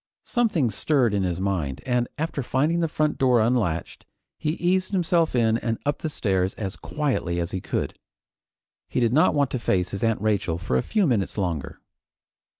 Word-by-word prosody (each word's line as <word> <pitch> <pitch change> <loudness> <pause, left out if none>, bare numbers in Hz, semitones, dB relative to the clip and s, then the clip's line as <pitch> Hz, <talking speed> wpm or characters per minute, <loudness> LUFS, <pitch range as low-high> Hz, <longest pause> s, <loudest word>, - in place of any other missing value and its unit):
Something 185 - +1
stirred 125 0 +2
in 100 - +1
his 90 -2 -1
mind, 85 -9 -1
and 125 -1 +1
after 155 -1 -2
finding 145 +7 +1
the 165 - +1
front 155 -1 -1
door 125 -3 +4
unlatched, 110 -8 0 0.4
he 150 - 0
eased 185 +3 0
himself 170 -4 +2
in 115 -1 +3
and 115 -2 -1
up 145 0 0
the 160 - -3
stairs 95 -9 0
as 100 -2 -4
quietly 135 - -2
as 85 0 -2
he 95 - -3
could. - - -2 1.0
He - - -1
did 120 -1 +2
not 155 +2 +4
want 140 -2 +2
to 130 - -1
face 90 -5 0
his 100 - -4
Aunt 115 -1 +2
Rachel 100 -6 0
for 85 -7 -2
a 65 - +3
few 210 -3 +1
minutes 115 - 0
longer. 85 -8 -3
120 Hz, 185 wpm, -25 LUFS, 95-150 Hz, 1.0 s, door